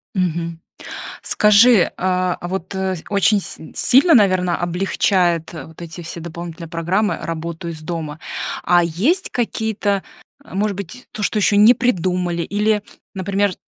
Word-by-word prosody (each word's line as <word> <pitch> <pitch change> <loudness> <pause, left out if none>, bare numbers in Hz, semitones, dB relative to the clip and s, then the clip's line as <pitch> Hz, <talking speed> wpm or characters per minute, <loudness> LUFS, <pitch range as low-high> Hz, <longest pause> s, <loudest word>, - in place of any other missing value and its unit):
Мгм. 170 -2 -1 0.6
Скажи, 210 -1 +5
а, 185 -1 0
вот, 185 +1 -5
э, 190 -1 -1
очень 200 +1 +3
си 160 - -6
сильно, 265 - +5
наверное, 185 -6 +4
облегчает 175 -1 0
вот 160 +1 -10
эти 170 +1 -8
все 170 +1 -7
дополнительные 170 0 -8
программы 175 +6 0
работу 165 +1 -5
из 160 -2 -6
дома? 155 -2 -5 0.4
А 175 -1 +4
есть 230 - 0
какие-то, 220 -4 -1 0.4
а, 190 - -12
может 205 0 0
быть, 200 +6 -8
то, 215 - -7
что 215 - 0
еще 205 0 +3
не 220 +4 +8
придумали, 180 -7 0
или, 210 0 0 0.3
например, 195 +1 0
185 Hz, 135 wpm, -19 LUFS, 170-205 Hz, 0.6 s, не